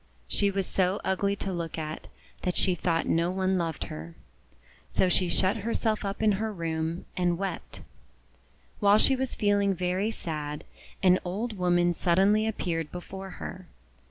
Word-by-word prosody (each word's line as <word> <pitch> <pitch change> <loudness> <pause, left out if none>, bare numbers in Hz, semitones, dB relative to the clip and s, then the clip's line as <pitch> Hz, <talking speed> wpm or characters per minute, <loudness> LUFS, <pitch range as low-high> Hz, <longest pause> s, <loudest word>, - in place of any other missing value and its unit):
She 200 - +2
was 195 -1 -1
so 185 +2 +1
ugly 200 +1 +1
to 195 -1 -3
look 170 -2 -4
at 155 -1 -5 0.3
that 180 - -1
she 185 - +4
thought 165 -1 0
no 170 +1 +2
one 190 0 +1
loved 165 -3 -2
her. 80 +2 -7 0.7
So 185 - +2
she 180 0 +2
shut 185 +5 +2
her 225 +2 -2
self 220 -2 0
up 200 +2 -3
in 215 - +5
her 220 0 -1
room, 165 -2 -3
and 175 -1 +1
wept. 195 -1 -5 1.0
While 205 0 +6
she 265 +4 +4
was 265 -1 -2
feeling 200 -1 +2
very 180 +4 0
sad, 150 -7 -4 0.4
an 185 0 +6
old 210 +6 -3
woman 175 -1 +3
suddenly 195 +6 +3
appeared 165 -7 -2
before 190 +2 -7
her. 185 -1 -7
185 Hz, 160 wpm, -28 LUFS, 170-200 Hz, 1.0 s, While